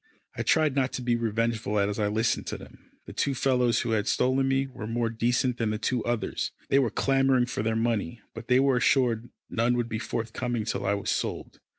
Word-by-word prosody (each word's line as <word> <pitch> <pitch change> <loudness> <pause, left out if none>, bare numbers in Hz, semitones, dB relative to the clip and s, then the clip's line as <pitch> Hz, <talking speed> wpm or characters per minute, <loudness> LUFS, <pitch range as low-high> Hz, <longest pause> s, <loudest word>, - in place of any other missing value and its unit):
I - - -3
tried 155 -4 +2
not 135 -2 +1
to 125 - -4
be 120 -1 +2
revengeful 115 -2 -1
as 100 +1 0
I 105 - +2
listened 110 +2 0
to - - -3
them. - - -15 0.2
The - - -9
two 140 -1 0
fellows 125 -2 +2
who - - -2
had 110 0 0
stolen 130 +1 +2
me 135 0 +2
were 125 -5 -8
more 115 0 -1
decent 120 +2 +1
than 115 -2 +1
the 110 - -1
two 120 +1 -1
others. 120 -1 -1 0.2
They 135 - +5
were 130 -4 +2
clamouring 135 +1 +2
for 120 - -3
their 110 +1 0
money, 115 -3 -1
but 115 +1 -9
they 125 0 +4
were 135 -1 +3
assured 120 -2 +2 0.2
none 120 +2 +1
would 120 -1 -1
be 110 -1 -2
forthcoming 115 0 -3
till 105 - -2
I 100 - +2
was 100 - -2
sold. - - -3
120 Hz, 220 wpm, -27 LUFS, 110-130 Hz, 0.2 s, They